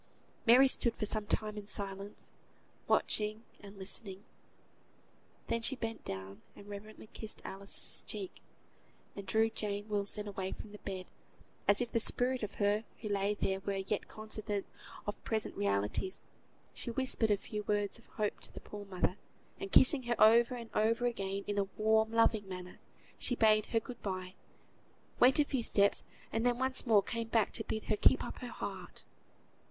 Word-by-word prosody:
Mary 255 +4 +8
stood 235 -3 +4
for - - -2
a 215 +1 0
time 215 -1 -1
in 200 - -11
silence, 200 0 -2 0.6
watching 215 +1 +1 0.2
and 200 -1 -12
listening. 195 0 -6 1.2
Then 230 - -1
she 270 +4 +3
bent 225 -3 -5
down 95 +2 -7
and 200 - -13
reverently 205 +2 -9
kissed 220 -1 -4
Alice's 195 +1 0
cheek; 385 -2 -6 0.7
and 200 -1 -8
drawing 225 +2 +3
Jane 205 0 -3
Wilson 205 0 0
away 190 -2 -4
from 210 - -10
the 210 - -11
bed, 190 -2 -5 0.6
as 205 +2 +5
if 240 - -2
the 230 - +2
spirit 250 +3 +4
of 210 - -5
her 205 +1 +1 0.2
who 215 - -4
lay 200 +1 +1
there 190 -1 -1
were 200 0 -3
yet 195 +1 -2
cognisant 215 -2 -3 0.4
of 205 - -5
present 220 -1 0
realities, 100 - -1 0.5
she - - 0
whispered 235 -2 +1
a 205 - +3
few 210 +1 -5
words 205 +1 0
of 230 - -22
hope 210 -2 -2
to - - -10
the - - -9
poor 205 -1 -9
mother, 185 0 -1 0.4
and 195 - -6
kissing 265 +1 +8
her 240 - +2
over 235 +3 +6
and 235 -2 -8
over 230 +3 +2
again 200 -4 -2
in 205 0 -1
a 195 - 0
warm, 220 +1 +3
loving 225 -3 +3
manner, 180 -1 -8 0.4
she 250 - +1
bade 215 -2 +4
her 225 - +1
good 240 +2 -10
bye, 185 -2 -4 0.9
went 255 +2 +6
a 295 - +4
few 265 -3 -1
steps, 200 -3 +2 0.3
and 225 - 0
then 245 -1 +2
once 260 0 0
more 210 -3 +5
came 230 +2 -3
back 225 -2 +1
to - - 0
bid 220 - -3
her 215 - 0
keep - - +4
up - - -7
her - - -6
heart. - - -7
210 Hz, 175 wpm, -33 LUFS, 200-230 Hz, 1.2 s, Mary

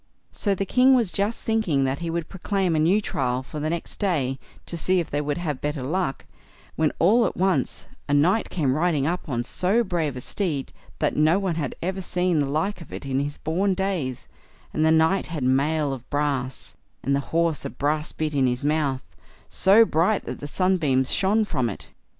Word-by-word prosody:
So 200 -2 0
the 195 - -2
king 255 +5 +5
was 230 -7 +2
just 205 +3 -1
thinking 220 -12 +1
that 135 +1 -1
he 170 -1 -3
would 170 -1 -2
proclaim 190 -2 -1
a - - +2
new 180 +7 +3
trial 130 -8 -1
for 150 +3 -7
the 155 +1 -1
next 170 +1 -4
day, 140 -10 0 0.3
to - - -3
see 185 +2 +2
if 170 - -4
they 145 - 0
would 145 -1 -2
have 155 -6 -3
better 150 -2 -2
luck, 160 0 -2 0.5
when 155 -1 +2
all 225 +8 +4
at - - -6
once 190 0 0 0.2
a - - +2
knight 180 +10 +3
came 145 -7 0
riding 155 -2 +1
up 170 0 -2
on 120 -3 -1
so 190 - +1
brave 165 - -1
a - - -5
steed, 155 -4 -2 0.2
that - - 0
no 155 +4 +4
one 195 -3 -1
had 155 -5 -3
ever 190 +2 -2
seen 180 -2 0
the 145 - +1
like 175 +6 -1
of 165 - -12
it - - -7
in 135 -1 0
his 145 +1 -3
born 185 +5 0
days, 180 -10 -2 0.5
and 155 - +1
the 160 - +4
knight 160 +4 +3
had 155 -5 -4
mail 140 +3 +1
of 125 -2 -9
brass, 140 -3 -2 0.3
and 140 - +1
the - - +1
horse 165 -2 +1
a - - -3
brass 150 +2 -1
bit 155 -1 -3
in 135 -2 +3
his 125 +1 -2
mouth, 145 -3 0 0.4
so 205 +4 +5
bright 185 +4 +1
that - - -6
the 145 - -6
sunbeams 150 -7 +1
shone 210 +3 +2
from 130 - -1
it. 100 - -7
160 Hz, 210 wpm, -24 LUFS, 140-185 Hz, 0.5 s, king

